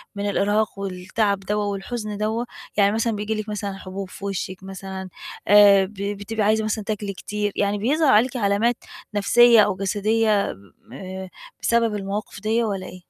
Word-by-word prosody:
من 200 0 -2
الإرهاق، 205 +1 0
والتعب 195 +2 -1
دوّة 205 +1 -2
والحزن 205 +1 -4
دوّة؟ 220 +3 -1 0.3
يعني 200 0 +5
مثلًا 225 +1 0
بييجي 210 +2 -2
لكِ 215 0 -5
مثلًا 210 0 -4
حبوب 190 0 -7
في 200 - -9
وشِك 190 -1 -4
مثلًا، 190 0 -7 0.4
آآ 200 -1 +7
ب 205 - -12
بتبقي 205 +2 -3
عايزة 220 +1 +2
مثلًا 215 0 -2
تاكلي 205 -1 -3
كتير، 205 +2 -3
يعني 205 0 0
بيظهر 280 +6 +2
عليكِ 245 +4 +3
علامات 215 +3 +1 0.4
نفسية، 235 +3 +6
أو 205 -2 +2
جسدية 210 +3 0 0.6
آآ 190 +4 -7 0.3
بسبب 230 -2 +2
المواقف 200 +1 -4
ديّة 225 +2 +1
والّا 200 -4 -3
إيه؟ 185 0 -11
205 Hz, 160 wpm, -23 LUFS, 195-220 Hz, 0.6 s, آآ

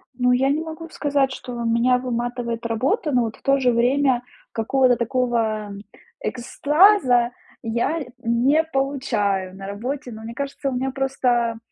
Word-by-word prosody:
Ну, 250 0 +2
я 265 +2 +2
не 300 +3 +1
могу 325 0 -7
сказать, 280 -3 0
что 250 -1 -7
меня 235 +2 +3
выматывает 240 -1 -3
работа, 265 - 0
но 245 -2 +3
вот 220 -1 -4
в - - -23
то 275 0 +2
же 250 -2 +3
время 250 +1 +2 0.3
какого-то 250 +2 +2
такого, 235 -3 0
м, 200 0 -8 0.4
экстаза 265 - +3 0.3
я 235 +8 -1 0.2
не 250 +6 +2
получаю 235 -10 -1
на 195 0 -8
работе, 245 +6 -5
но 220 0 -9
мне 230 +1 -7
кажется, 275 +1 -3
у 265 - -3
меня 265 +2 -1
просто, 250 -4 0
250 Hz, 155 wpm, -22 LUFS, 235-275 Hz, 0.4 s, меня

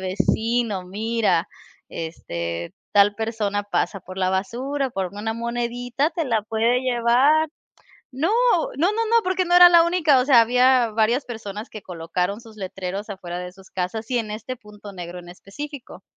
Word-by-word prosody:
vecino, 215 +2 0
mira, 220 +4 0 0.4
este, 85 - -5 0.2
tal 205 0 +5
persona 215 -2 -2
pasa 205 0 -2
por 185 +2 -10
la 185 -1 +1
basura, 255 +8 -2
por 190 -4 -2
una 215 +2 -3
monedita 240 +4 -2
te 330 0 -2
la 225 -5 0
puede 225 +3 +1
llevar". 260 +5 +3 0.6
No, 310 +10 0 0.4
no, 345 +7 +2
no, 450 - -1
no, 465 -1 +4
porque 370 0 0
no 350 0 +1
era 355 0 +10
la 340 -1 +7
única, 335 -6 +3
o 250 - +2
sea, 260 -4 +6
había 250 0 +4
varias 230 +5 +1
personas 220 -2 -7
que 215 -3 -9
colocaron 180 +4 -3
sus 225 -2 -15
letreros 195 +1 -5
afuera 175 -3 -6
de 180 0 -7
sus 190 0 -18
casas 220 +6 -4
y 245 - +1
en 215 -2 -3
este 230 +4 -6
punto 210 -2 -13
negro 175 -1 -7
en 175 - -14
específico. 265 +10 -9
225 Hz, 165 wpm, -23 LUFS, 195-255 Hz, 0.6 s, era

